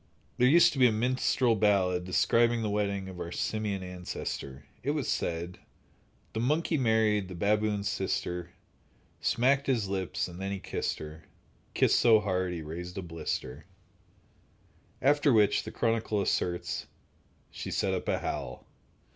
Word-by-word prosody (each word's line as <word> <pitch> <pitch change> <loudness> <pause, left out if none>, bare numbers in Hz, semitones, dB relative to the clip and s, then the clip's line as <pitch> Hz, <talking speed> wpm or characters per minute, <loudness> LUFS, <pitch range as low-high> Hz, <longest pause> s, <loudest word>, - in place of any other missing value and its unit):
There 125 - +5
used 170 +6 +6
to 135 - -4
be 125 - +7
a - - +2
minstrel 125 +1 +1
ballad 95 -4 +2
describing 115 +5 +2
the 105 - -1
wedding 100 -2 -1
of 95 -2 -9
our 85 -1 -5
simian 105 -1 -2
ancestor. 90 -6 -6 0.2
It 145 +4 -1
was 140 - -2
said: 85 +1 -2 0.7
The 110 - -2
monkey 155 +7 +1
married 110 -6 +2
the 90 - -8
baboon's 105 +2 +1
sister, 90 -3 -2 0.7
Smacked 135 +4 +2
his 120 -7 +1
lips, 95 -2 -2
and 90 +1 -9
then 95 0 -3
he 100 - -2
kissed - - -3
her— 80 +1 -9 0.5
Kissed - - +4
so 115 -2 +6
hard 95 -3 -1
he 85 -2 -5
raised 90 +4 -7
a 95 - -3
blister— 80 +1 -5 1.4
After 145 +1 +4
which, 105 -4 +3
the - - -6
chronicler 115 -3 0
asserts: 90 -1 -1 0.6
She - - -6
set - - 0
up - - -3
a - - +1
howl. - - -5
100 Hz, 150 wpm, -29 LUFS, 90-115 Hz, 1.4 s, be